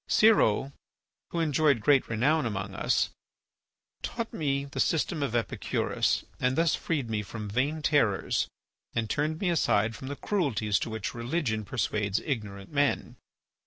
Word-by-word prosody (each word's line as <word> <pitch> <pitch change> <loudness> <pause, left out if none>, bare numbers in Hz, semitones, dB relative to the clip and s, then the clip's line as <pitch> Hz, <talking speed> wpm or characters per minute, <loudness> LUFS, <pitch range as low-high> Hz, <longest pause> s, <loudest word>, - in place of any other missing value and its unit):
Siro, 140 - +4 0.6
who 170 - -2
enjoyed 150 -4 +3
great 135 +5 +4
renown 135 +5 +2
among 95 -2 -4
us, - - +1 0.9
taught 230 -1 -4
me 140 -3 -1
the 140 - -7
system 160 -1 +1
of 135 -4 -1
Epicurus 115 -4 0
and 125 +1 +1
thus 165 0 +3
freed 145 -7 -1
me 110 -2 -1
from 105 +1 -6
vain 140 +9 -1
terrors 115 -11 +2 0.5
and 115 -1 0
turned 155 +2 0
me 185 -3 +1
aside 115 -9 +2
from 130 - -8
the 145 - -4
cruelties 115 - 0
to - - -3
which 110 -3 -4
religion 120 -2 -1
persuades 105 -3 -1
ignorant 100 -8 -4
men. 145 -1 +1
130 Hz, 145 wpm, -28 LUFS, 110-150 Hz, 0.9 s, Siro